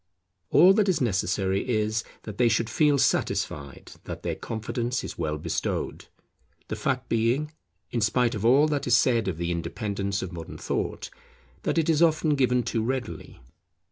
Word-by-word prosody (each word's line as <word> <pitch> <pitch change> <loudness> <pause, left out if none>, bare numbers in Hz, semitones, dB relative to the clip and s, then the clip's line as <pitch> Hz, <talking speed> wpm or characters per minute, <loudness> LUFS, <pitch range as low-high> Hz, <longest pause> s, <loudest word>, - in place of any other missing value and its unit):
All 185 +3 +7
that 205 -1 +2
is 185 - +2
necessary 95 -2 0
is, 110 -1 0 0.2
that 105 0 -8
they 120 -1 +5
should 115 0 0
feel 150 +1 +3
satisfied 70 - -1
that - - -7
their - - -1
confidence 120 +2 -3
is - - -6
well 75 -2 -1
bestowed, 75 - -3 0.6
the - - -2
fact 130 -1 -2
being, 120 +7 +1 0.4
in 120 - -1
spite 120 +3 +2
of 105 -2 -4
all 135 +6 +5
that 145 -3 -1
is 120 -1 +5
said 115 -5 +2
of 90 -4 -2
the 85 +1 -2
independence 100 +3 -3
of 90 -1 -6
modern 85 -2 -8
thought, - - -3 0.5
that - - -1
it 160 - +2
is 160 -1 +2
often 155 -2 +3
given 125 -3 +2
too 115 0 -1
readily. 125 - -4
115 Hz, 170 wpm, -26 LUFS, 100-135 Hz, 0.6 s, All